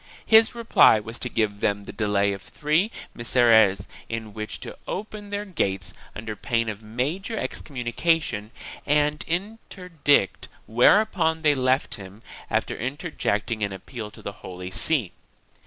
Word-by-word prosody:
His 225 +1 +6
reply 230 - +5
was 115 +2 -8
to 125 - -2
give 105 -3 0
them 100 0 0
the - - -9
delay 100 -1 +1
of 100 - -7
three 155 - 0 0.2
Misereres 110 -5 +4 0.2
in 110 -2 -5
which 110 0 -5
to - - -7
open 210 +1 -5
their 205 0 -3
gates 95 - -2 0.2
under 110 0 -5
pain 115 0 -1
of 105 -1 -6
major 145 - -3
excom 135 -10 -4
munication 120 -5 0 0.4
and 150 +1 +2
interdict, 180 - 0 0.2
whereupon 160 - +3
they 150 -1 +5
left 130 0 +1
him, 95 +3 -12 0.3
after - - 0
inter 145 +8 -4
jecting 110 -3 -1
an 100 - -1
appeal 105 +3 -7
to - - -15
the 100 - -4
Holy 90 0 -7
See. 125 - 0
120 Hz, 145 wpm, -25 LUFS, 105-165 Hz, 0.4 s, His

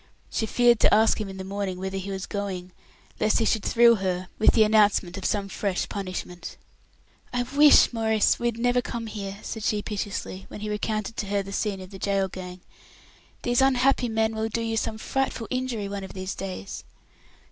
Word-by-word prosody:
She 220 - -1
feared 240 0 +4
to - - +4
ask 220 +1 +4
him 205 - -4
in 190 - -8
the 190 - -5
morning 195 -1 -3
whither 190 +1 -3
he 195 +1 -6
was 190 0 -4
going, 190 -3 -4 0.5
lest 215 0 +2
he 225 - +2
should 220 - +2
thrill 235 +1 +5
her 185 -1 -2
with 220 - +5
the 220 - +6
announcement 210 -4 +3
of 195 - -6
some 200 -2 0
fresh 195 -1 -2
punishment. 185 -2 -6 0.7
"I 245 0 0
wish, 285 +1 +6
Maurice, 220 -2 +2
we 240 - 0
had 235 -1 -2
never 245 +1 +2
come 235 -2 -5
here," 200 -2 -6
said 220 - -5
she, 210 -2 0
piteously, 200 -2 -4
when 210 - -9
he 210 0 -3
recounted 215 +1 -2
to 205 - -3
her 200 0 0
the 195 +1 -8
scene 200 -1 -1
of 185 +1 -10
the 195 - -9
gaol 195 -1 0
gang. 180 0 -8 0.8
"These 245 +1 +2
unhappy 260 -1 +3
men 220 0 +1
will 220 0 -1
do 230 +1 -2
you 225 0 -1
some 220 0 -1
frightful 265 0 -2
injury 255 -5 -2
one 200 0 -5
of 190 - -8
these 185 0 -4
days." 185 - -6
210 Hz, 200 wpm, -26 LUFS, 195-230 Hz, 0.8 s, the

